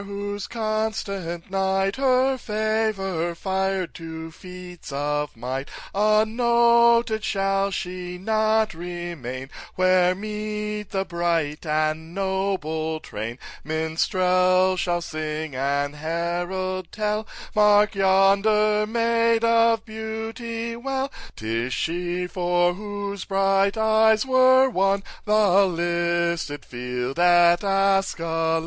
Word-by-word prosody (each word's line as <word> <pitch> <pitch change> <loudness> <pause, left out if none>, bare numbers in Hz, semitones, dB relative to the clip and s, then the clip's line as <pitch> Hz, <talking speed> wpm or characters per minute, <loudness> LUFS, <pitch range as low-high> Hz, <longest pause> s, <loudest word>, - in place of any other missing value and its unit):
whose 200 0 -5
constant 215 -6 -3
knight 195 +1 0
Her 265 0 +3
favour 210 -7 -1
fired 190 0 -2
to 160 0 -8
feats 180 -1 -11
of 145 -1 -2
might; 130 +4 -4 0.2
Unnoted 235 +2 +3
shall 195 -1 0
she 180 -1 -5
not 220 +2 +1
remain, 165 -7 -6 0.2
Where 185 0 +3
meet 210 0 -4
the 195 0 -2
bright 170 -3 -1
and 155 +2 -1
noble 190 -5 -2
train; 115 -2 -6 0.3
Minstrel 185 +4 +2
shall 175 -1 -1
sing 155 -2 -4
and 140 +2 -1
herald 175 +3 -3
tell— 215 0 -2 0.3
'Mark 210 0 +5
yonder 200 +2 +3
maid 230 0 +2
of 230 -1 +3
beauty 225 +1 -5
well, 270 +2 -3 0.2
'Tis 115 +3 -3
she 175 +4 -2
for 175 -1 +1
whose 200 0 -5
bright 195 +1 +2
eyes 220 +1 +3
were 260 0 +5
won 195 -4 +1 0.2
The 200 -2 +4
listed 170 -3 -1
field 125 +3 -4
at 175 0 +5
Askalon! 190 -5 +1
190 Hz, 100 wpm, -24 LUFS, 170-215 Hz, 0.3 s, Mark